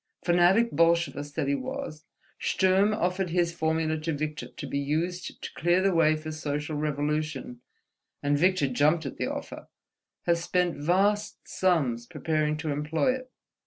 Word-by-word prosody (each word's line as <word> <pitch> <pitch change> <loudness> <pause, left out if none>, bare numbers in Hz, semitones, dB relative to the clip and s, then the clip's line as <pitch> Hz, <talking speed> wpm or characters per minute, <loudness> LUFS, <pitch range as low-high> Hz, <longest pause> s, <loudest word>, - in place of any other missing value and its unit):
Fanatic 180 +7 +4
Bolshevist 165 -4 +1
that 155 -4 -1
he 140 - +2
was, 260 - -5 0.3
Sturm 190 +2 +3
offered 185 -3 0
his 170 0 +1
formula 160 -1 0
to 160 +1 -2
Victor, 150 +1 -4
to - - -9
be 140 - -2
used 165 +5 -2
to - - -6
clear 175 +2 +2
the 195 -1 +3
way 155 -2 +4
for 155 0 -6
social 150 0 -3
revolution; 150 -3 -2 0.6
and 145 0 +2
Victor 180 -1 +3
jumped 150 +5 +2
at 135 - -6
the - - -1
offer—has 170 -1 -5
spent 180 -1 +1
vast 195 +7 0
sums 135 -11 +1
preparing 155 -1 -1
to 155 -1 -3
employ 150 - +1
it. 255 0 -8
160 Hz, 150 wpm, -27 LUFS, 150-180 Hz, 0.6 s, Fanatic